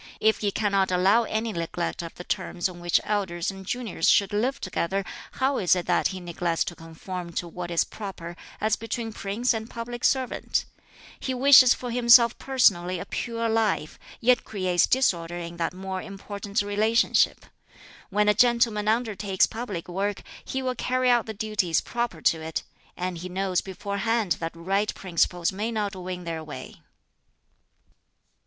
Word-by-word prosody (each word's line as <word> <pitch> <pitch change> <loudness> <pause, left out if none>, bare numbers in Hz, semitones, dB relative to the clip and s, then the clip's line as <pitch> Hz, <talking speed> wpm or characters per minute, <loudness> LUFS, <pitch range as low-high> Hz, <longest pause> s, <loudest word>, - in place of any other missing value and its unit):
If 220 0 +3
he 205 - 0
cannot 200 -2 +1
allow 195 +6 +4
any 220 +1 -2
neglect 170 0 -3
of 170 -1 -8
the 180 - -8
terms 180 -2 -2
on 180 -2 -10
which 175 0 +2
elders 190 -4 -1
and 195 0 -10
juniors 215 -5 -1
should 200 +1 +4
live 245 +6 0
together, 190 +1 -2 0.3
how 265 +1 +1
is 185 -1 +4
it 180 -2 -2
that - - +2
he 190 - -6
neglects 170 -1 -1
to 175 - -6
conform 170 +2 -7
to 175 - -3
what 175 +1 -6
is 170 -1 +2
proper 185 -5 -8 0.2
as 215 0 +2
between 225 0 -4
prince 215 +7 0
and 220 0 -5
public 240 +1 -6
servant? 260 -2 +1 0.5
He 260 - -2
wishes 260 -1 +8
for 245 -1 -6
himself 235 -1 +6
personally 185 -9 +2
a - - -6
pure 230 -1 -2
life, 220 -8 0 0.2
yet 245 +1 +3
creates 185 -4 +1
disorder 175 -10 +1
in 170 0 -7
that 170 - -1
more 190 0 -5
important 200 +1 -4
relationship. 215 +3 +2 0.6
When 210 +1 +2
a 210 - +6
gentleman 230 -2 +3
undertakes 215 -4 +2
public 215 -7 -5
work, 195 +3 -2 0.2
he 265 0 -3
will 255 -1 0
carry 255 +1 +1
out 240 -2 +2
the 220 - -5
duties 205 -6 0
proper 235 -9 -3
to 160 - +3
it; 160 0 -4 0.3
and 180 -1 -3
he 180 +2 -6
knows 190 0 0
beforehand 200 +1 -1
that 165 0 -4
right 195 +5 0
principles 175 -1 0
may 210 +4 -3
not 210 -3 -2
win 180 -1 -6
their 165 -2 -4
way." 150 -1 -9
200 Hz, 165 wpm, -26 LUFS, 180-230 Hz, 0.6 s, wishes